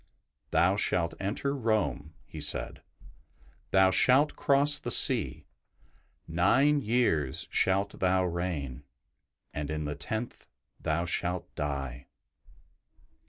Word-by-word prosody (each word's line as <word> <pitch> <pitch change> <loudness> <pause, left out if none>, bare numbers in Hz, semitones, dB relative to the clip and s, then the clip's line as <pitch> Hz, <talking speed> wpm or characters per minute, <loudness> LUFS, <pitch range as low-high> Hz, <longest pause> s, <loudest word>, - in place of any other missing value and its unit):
''Thou 90 +3 +3
shalt 85 -4 0
enter 110 +8 -2
Rome,'' 110 - -1
he 80 - -9
said; - - -1 0.4
'' - - -32
thou 95 0 +4
shalt 130 +10 +4
cross 145 +1 +3
the - - -5
sea; - - +3 0.8
nine 130 - +2
years 105 - 0
shalt 100 +1 0
thou 95 0 +2
reign, 85 -7 -4 0.7
and 75 -1 -4
in 75 0 -3
the 75 - -3
tenth 110 +9 -5 0.3
thou 85 +2 -1
shalt 90 +1 -2
die." 70 -4 -5
90 Hz, 110 wpm, -29 LUFS, 75-110 Hz, 0.8 s, thou